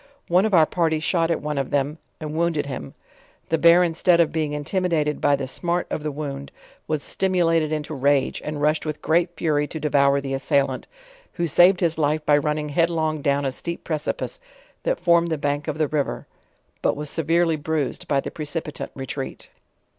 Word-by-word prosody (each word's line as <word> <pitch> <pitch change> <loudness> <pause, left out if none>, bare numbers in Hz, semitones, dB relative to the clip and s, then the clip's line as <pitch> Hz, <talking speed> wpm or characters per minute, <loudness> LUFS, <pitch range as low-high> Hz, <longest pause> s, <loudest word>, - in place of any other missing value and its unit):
One 180 +5 +4
of 215 - -4
our 160 -2 +7
party 160 -1 0
shot 165 +1 +1
at 165 - -1
one 150 -2 -2
of 135 - -2
them, 145 +3 -1 0.2
and 155 -1 -5
wounded 165 -2 0
him, 125 - -7 0.5
the 165 - +1
bear 170 +2 +7
in 170 -2 0
stead 170 +1 +3
of 170 - +3
being 155 -2 -1
intimidated 155 0 -1
by 145 -1 +4
the 135 -1 -4
smart 175 +6 -1
of - - -2
the 150 0 -3
wound, 140 -1 -6 0.4
was 155 -2 -1
stimulated 165 -4 +1
into 155 0 -3
rage, 140 0 +1
and 150 -1 -4
rushed 155 +1 +2
with 155 -1 -5
great 170 +2 +2
fury 150 -3 +1
to 160 - -6
devour 140 -2 +3
the 135 -1 -4
assailant, 135 +1 0 0.5
who 170 - -3
savpd 175 +3 +5
his 165 -2 +1
life 150 +1 +1
by 145 - +5
running 150 0 -2
headlong 160 -1 0
down 140 -1 +1
a 135 - 0
steep 170 +6 -5
precipice, 160 - -3 0.4
that - - -1
formed 170 -1 +3
the 160 - -1
bank 145 +1 -2
of 155 -1 -2
the 155 -1 +1
river; 145 -1 -2 0.6
but - - +1
was 150 +1 -5
severely 165 +1 +2
bruised 150 -2 -2
by 140 - +2
the - - -5
precipitant 150 0 -5
retreat. 135 0 -6
155 Hz, 190 wpm, -23 LUFS, 145-170 Hz, 0.6 s, our